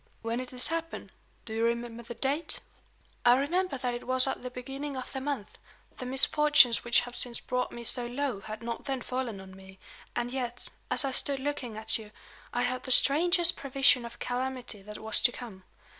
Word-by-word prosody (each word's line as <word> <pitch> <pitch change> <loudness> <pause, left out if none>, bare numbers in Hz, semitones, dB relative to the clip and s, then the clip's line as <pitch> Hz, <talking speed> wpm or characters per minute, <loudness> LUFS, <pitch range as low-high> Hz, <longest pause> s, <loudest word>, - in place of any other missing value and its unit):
"When 230 +1 -1
did 255 -1 -5
this 250 -1 -1
happen? 330 0 -4 0.3
Do 220 - -7
you 225 +1 0
remember 235 0 -1
the 235 0 -8
date?" 280 +6 -1 0.6
"I 245 0 +7
remember 340 +3 0
that 250 -1 -2
it 240 - -6
was 255 0 +3
at 265 - -3
the 250 - -5
beginning 270 +3 -6
of 255 - -7
the 265 - -3
month. 265 -7 -4 0.4
The 255 - -5
misfortunes 270 -1 +5
which 240 0 +4
have 245 0 -8
since 240 -1 -2
brought 250 0 -2
me 235 - -8
so 240 +1 +5
low 250 -3 -2
had 215 +3 -8
not 235 0 -5
then 270 -2 -2
fallen 250 -5 -3
on 190 0 -11
me; 190 0 -14 0.4
and 240 0 -2
yet, 250 -2 -3 0.2
as - - +2
I 270 - -1
stood 275 +1 +1
looking 265 -5 -4
at 220 +1 +2
you, 215 -1 -10 0.4
I 245 - 0
had 250 +1 -1
the 255 - -4
strangest 345 +7 +6
prevision 270 -2 +3
of 235 0 -9
calamity 250 -3 -3
that 210 +2 -9
was 220 0 -1
to 240 - +4
come. 210 -7 -10
250 Hz, 205 wpm, -29 LUFS, 235-270 Hz, 0.6 s, I